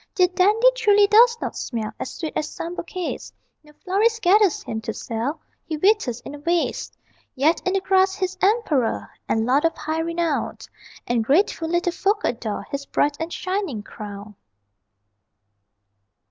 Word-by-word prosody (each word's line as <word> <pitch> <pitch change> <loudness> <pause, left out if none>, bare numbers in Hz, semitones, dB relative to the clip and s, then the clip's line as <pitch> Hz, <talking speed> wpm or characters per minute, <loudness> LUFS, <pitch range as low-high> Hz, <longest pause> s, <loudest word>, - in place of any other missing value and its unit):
Dear 365 -4 +4
Dandy 420 +7 +4
truly 415 -4 +5
does 465 +3 +6
not - - -4
smell 220 -4 -4
As - - -4
sweet 320 -3 -5
as 300 - -1
some 335 +1 -6
bouquets; 355 0 -5 0.3
No 300 - -18
florist 435 +4 +1
gathers 395 -1 +4
him 220 0 -4
to 220 0 -4
sell, 245 +7 -3 0.2
He 315 - -4
withers 305 - +2
in 275 - -9
a 290 - -8
vase; 335 +3 -1 0.4
Yet 300 +5 +2
in 370 - +1
the 390 - +1
grass 380 0 +3
he's 375 -2 -2
emperor, 380 - +1 0.2
And 225 0 +1
lord 265 +4 +3
of 330 - +1
high 315 +1 -2
renown; 335 -2 -1 0.5
And 235 -1 +1
grateful 325 - +2
little 345 +1 +1
folk 405 +4 0
adore 230 -3 -2
His 280 0 -4
bright 290 0 +1
and 325 +1 -4
shining 370 - -3
crown. 205 0 -9
335 Hz, 160 wpm, -23 LUFS, 270-390 Hz, 0.5 s, does